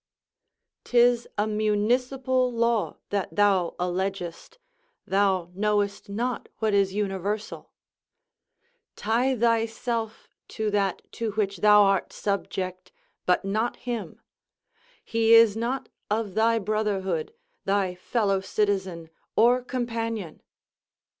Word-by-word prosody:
'Tis 240 -1 +3
a 210 - +2
municipal 250 +5 +1
law 235 -2 0
that 200 -2 -2
thou 195 -4 +2
allegest, 180 - -3 0.5
thou 190 -3 +1
knowest 205 0 -1
not 240 +5 -3
what 220 -2 0
is 200 -1 +3
universal 205 +1 -3 1.2
Tie 245 +5 +1
thyself 230 0 -1 0.2
to 215 -1 -2
that 200 -2 0
to 225 -3 -3
which 200 -2 -1
thou 210 +2 +6
art 195 -2 +1
subject, 185 -2 -3 0.4
but 180 +2 +2
not 215 +4 0
him; 240 -3 -5 0.9
he 230 0 +4
is 230 -2 +7
not 240 +4 -2 0.2
of 210 -2 -1
thy 225 +2 +3
brotherhood, 200 -5 -1 0.3
thy 195 -2 +1
fellow 195 +2 0
citizen, 190 -5 -1 0.3
or 245 +3 +5
companion. 230 -7 -4
210 Hz, 100 wpm, -26 LUFS, 195-230 Hz, 1.2 s, is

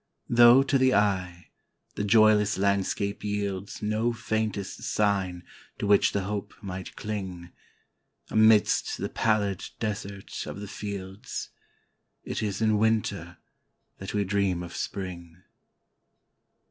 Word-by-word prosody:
Though, 120 +2 +7
to 135 0 +1
the 130 0 +4
eye, 95 -4 0 0.4
the - - -3
joyless 105 -1 +4
landscape 100 +1 0
yieldsNo 105 +3 -2
faintest 110 -4 -3
sign 95 -4 0 0.3
to - - -3
which 100 0 +4
the 100 - -1
hope 100 +1 -4
might 95 -2 -7
cling,—Amidst 105 +2 -1
the - - -3
pallid 105 -4 0
desert 100 -3 -5
of - - -6
the 105 - -7
fields,—It 100 -1 -8
is 105 0 -2
in 110 -1 +3
Winter 105 -6 0 0.6
that 95 +2 -6
we 105 - +2
dream 95 -3 0
of 85 0 -8
Spring. 90 -2 -6
100 Hz, 110 wpm, -27 LUFS, 95-110 Hz, 0.6 s, Though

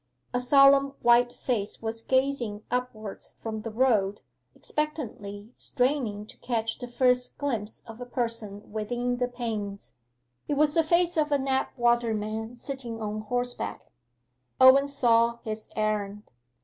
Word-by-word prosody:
A 250 - +2
solemn 275 +2 +5
white 240 +1 +5
face 225 -5 -3
was 225 0 -3
gazing 260 -5 0
upwards 230 -5 -4
from 220 -1 -4
the 225 - -5
road, 215 -4 +2 0.3
expectantly 230 -8 -4
straining 245 -6 -1
to - - -14
catch 225 -2 -2
the 245 - -5
first 250 0 +1
glimpse 230 -7 -3
of 225 +1 -11
a - - -4
person 230 -5 -4
within 245 +3 -2
the 250 0 0
panes. 220 -5 -5 0.5
It 290 - 0
was 295 +1 +3
the 330 - +4
face 340 +2 +2
of 300 -1 +2
a 285 - +4
Knapwater 240 -4 +1
man 220 +2 -4
sitting 240 -2 -6
on 215 0 -3
horseback. 245 +3 -3 0.7
Owen 260 +2 +8
saw 235 -4 +3
his 215 0 -5
errand. 210 -1 -1
240 Hz, 135 wpm, -27 LUFS, 215-260 Hz, 0.7 s, Owen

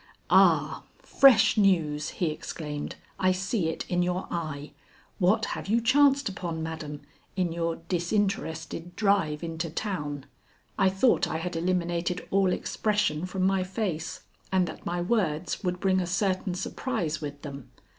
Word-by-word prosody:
"Ah, - - +4 0.2
fresh 270 -5 +5
news!" 160 -7 +2
he 170 -4 +1
exclaimed. 150 -1 -5 0.2
"I 185 0 +4
see 185 -1 0
it 160 - -4
in 180 -1 +1
your 180 +1 -1
eye. 155 -4 -4 0.5
What 210 +4 +3
have - - -6
you 225 +4 +3
chanced 275 +3 +4
upon, 170 -4 -4
madam, 155 -2 -5 0.3
in 180 -3 0
your 165 0 -1
disinterested 175 -2 -2
drive 195 -8 +1
into 165 0 -3
town?" 150 -6 -4 0.5
I 190 - +4
thought 190 -1 +3
I 160 - -2
had 170 +1 -4
eliminated 175 0 -1
all 195 -1 +3
expression 205 -6 0
from 185 0 -2
my 190 -1 +2
face, 185 -4 -3 0.3
and 185 -1 +3
that 160 - -8
my 175 0 -1
words 180 -4 0
would 180 -1 -1
bring 190 -1 +2
a 180 - -1
certain 185 0 0
surprise 185 - -2
with 145 -1 -6
them. 140 -4 -8
180 Hz, 145 wpm, -27 LUFS, 160-195 Hz, 0.5 s, fresh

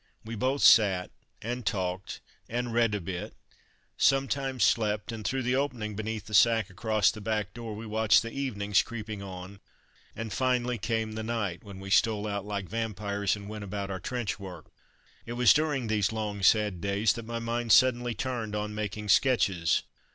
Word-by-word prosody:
We 115 - -6
both 130 +5 0
sat 95 -5 +5 0.3
and 120 +2 -3
talked 95 -2 -3 0.3
and 120 0 -2
read 115 -3 +2
a - - -1
bit, 90 0 -6 0.6
sometimes 135 -2 +1
slept, 105 +3 +1
and 110 -2 -6
through 135 +4 -1
the 125 +1 +1
opening 125 -7 -2
beneath 110 0 -4
the 110 - -10
sack 110 -1 +4
across 110 +1 +2
the 110 - -9
back 105 -1 -2
door 115 -3 -6
we 110 +2 -7
watched 110 0 +3
the 115 - -6
evenings 105 -7 +1
creeping 110 -3 -6
on, 95 0 -8 0.6
and 110 -2 -5
finally 125 +1 0
came 110 +1 -1
the 110 +1 -4
night, 110 -6 -3
when 100 -3 -10
we 95 0 -8
stole 105 0 +3
out 100 -1 -3
like 100 -2 -3
vampires 105 -2 -1
and 100 -1 -9
went 105 0 -6
about 100 0 -4
our 95 - -4
trench 120 +1 -3
work. 90 -5 -10 0.6
It 120 - -4
was 125 0 +6
during 145 -4 0
these 110 -2 +1
long, 105 -2 -3
sad 105 -2 +3
days 100 +3 +2
that 115 -2 -8
my 115 0 -3
mind 115 0 -2
suddenly 120 -1 +4
turned 115 -3 -3
on 105 0 -3
making 105 0 -4
sketches. 95 -9 +3
110 Hz, 180 wpm, -28 LUFS, 100-120 Hz, 0.6 s, was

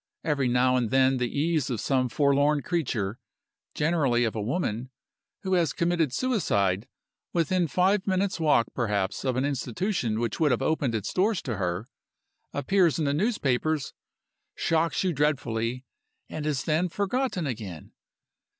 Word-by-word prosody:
Every 140 -4 +1
now 125 +1 +3
and 120 -3 0
then 130 +1 +3
the 125 -1 -1
ease 155 -1 0
of 120 -4 -2
some 130 0 +1
forlorn 145 +1 +2
creature 120 - -2 0.6
(generally 150 -7 +2
of 115 -2 -1
a 110 - -2
woman) 120 - -2 0.5
who 190 -1 -1
has 170 -4 +2
committed 170 -4 +1
suicide, 105 - 0 0.5
within 175 +1 +1
five 190 +5 +2
minutes' 190 0 0
walk, 150 -7 +4
perhaps, 100 -5 -1
of 130 -2 0
an 130 +2 +1
institution 130 - -1
which 115 -2 -2
would 155 -2 +4
have 125 0 +1
opened 140 -6 0
its 105 - -3
doors 200 +2 +2
to 120 -7 -3
her, 90 +3 -2 0.6
appears 170 +3 +2
in 160 - 0
the 140 - +1
newspapers, 155 - 0 0.6
shocks 165 -1 +1
you 185 -2 +1
dreadfully, 125 -4 -1 0.4
and 155 -1 -5
is 145 -3 -1
then 165 +3 +1
forgotten 200 0 -1
again. 105 - -6
140 Hz, 150 wpm, -27 LUFS, 120-170 Hz, 0.6 s, walk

